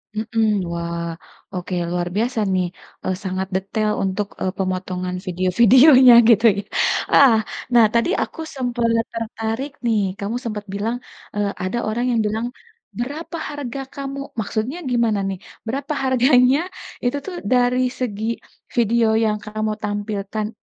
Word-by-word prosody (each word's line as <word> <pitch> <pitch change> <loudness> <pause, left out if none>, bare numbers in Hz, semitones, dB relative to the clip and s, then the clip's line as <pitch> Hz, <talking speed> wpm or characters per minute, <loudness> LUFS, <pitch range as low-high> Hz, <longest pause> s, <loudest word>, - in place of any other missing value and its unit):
Mhm, 220 +1 0 0.3
wah 170 0 -3 0.5
oke, 180 +1 -5 0.2
luar 175 0 -1
biasa 235 +3 0
nih, 185 -1 +2 0.4
eee, 185 - -1
sangat 190 0 -2
detail 210 +3 0
untuk, 195 +2 -1
eee, 185 - 0
pemotongan 185 -1 -2
video-videonya 235 - +6 0.2
gitu 230 0 +5
ya, - - -1 0.5
ah. 270 -5 +7 0.4
Nah 235 -2 +7
tadi 235 +7 +2
aku - - -10 0.2
sempet 240 -3 0 0.2
tertarik 225 +4 -3
nih 225 -2 +3 0.2
kamu 205 +4 -3
sempet 210 -2 -4
bilang, 215 +4 -1 0.4
eee, 205 -1 0
ada 185 +6 -2
orang 230 +3 -1
yang 235 - +2
bilang, 220 +2 -2 0.5
"Berapa 300 +7 -4
harga 280 -3 -5 0.2
kamu?" 275 -1 -5 0.2
Maksudnya 220 - -2
gimana 230 -4 +2
nih, 190 -2 -4 0.3
berapa 275 +5 -2
harganya 255 0 +4 0.5
itu 245 +3 +1
tuh 380 - -5 0.2
dari 250 +1 +3
segi 220 -4 -2 0.5
video 235 0 +3
yang 220 -1 +2
kamu 215 0 -2
tampilkan 205 0 -3
225 Hz, 135 wpm, -21 LUFS, 200-250 Hz, 0.5 s, ah